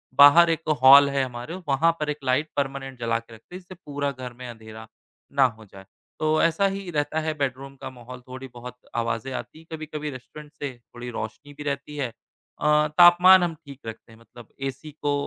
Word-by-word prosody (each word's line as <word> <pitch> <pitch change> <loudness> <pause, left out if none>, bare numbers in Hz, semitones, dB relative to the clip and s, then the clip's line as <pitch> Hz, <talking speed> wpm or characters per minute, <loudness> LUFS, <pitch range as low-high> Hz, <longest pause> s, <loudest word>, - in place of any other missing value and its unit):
बाहर 145 +4 +8
एक 165 -1 -2
हॉल 140 +2 +9
है 140 -1 0
हमारे, 125 +6 -6
वहाँ 145 +5 +3
पर 150 - -2
एक 150 - -2
लाइट 135 +4 +1
परमानेंट 135 -2 -3
जला 115 -1 0
कर 115 0 -17
रखते 115 +11 -14
हैं - - -6
जिससे 185 0 -13
पूरा 145 -1 -2
घर 125 -2 -8
में 125 +1 -9
अँधेरा, 110 -1 -11 0.4
ना 140 -1 +4
हो 110 -3 -4
जाए। 95 -1 -14 0.3
तो 155 0 +2
ऐसा 165 +4 +2
ही 195 -1 -5
रहता 150 +1 -1
है 155 0 -2
बेडरूम 135 0 -3
का - - -5
माहौल 125 0 -11
थोड़ी 130 +1 -8
बहुत 125 +1 -10 0.2
आवाज़ें 115 +2 -2
आती 155 - -7
हैं, 165 - -17
कभी-कभी 155 -1 -5
रेस्टोरेंट 145 +4 -11
से 145 -3 -5 0.2
थोड़ी 120 0 -7
रोशनी 120 +5 -7
भी 150 - -9
रहती 140 +1 -4
है 135 - -1 0.5
अ, 150 0 +3
तापमान 180 +1 +8
हम 170 -2 -1
ठीक 140 -1 -11
रखते 115 +1 -9
हैं 110 - -17
मतलब 115 0 -15 0.2
एसी 150 +4 -10
को 145 - +1
140 Hz, 205 wpm, -25 LUFS, 125-155 Hz, 0.5 s, हॉल